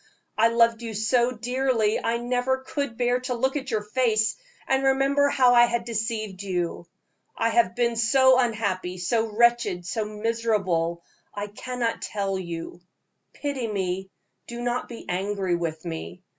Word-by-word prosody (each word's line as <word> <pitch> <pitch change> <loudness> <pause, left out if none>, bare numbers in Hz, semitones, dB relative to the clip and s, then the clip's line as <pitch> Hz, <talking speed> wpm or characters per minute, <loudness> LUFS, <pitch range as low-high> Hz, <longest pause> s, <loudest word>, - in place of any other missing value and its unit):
I 225 +1 +5
loved 230 0 +3
you 225 -2 -5
so 235 +3 +2
dearly 245 -2 0
I 230 +1 +1
never 250 +2 -1
could 280 -6 -3
bear 245 0 +2
to 250 0 -3
look 265 +3 0
at 275 -2 -3
your 215 -3 -1
face 215 -1 +1 0.3
and 265 0 +2
remember 275 +1 +3
how 250 -3 +4
I 240 0 +7
had 235 -1 -2
deceived 220 -4 -3
you. 175 -3 -3 0.5
I 230 - +2
have 230 -4 +2
been 235 -1 +1
so 260 +3 +5
unhappy, 200 -7 -1
so 220 +6 +1
wretched, 230 -5 +2
so 215 +4 -2
miserable, 210 -6 -1 0.3
I 205 0 -3
cannot 235 +3 -3
tell 195 -2 -2
you. 170 -1 -6 0.5
Pity 280 -5 -3
me 190 -2 -2 0.4
do 235 0 -7
not 245 +1 -2
be 235 - -9
angry 190 0 -1
with 165 -1 -4
me. 170 +2 -6
230 Hz, 155 wpm, -25 LUFS, 195-245 Hz, 0.5 s, I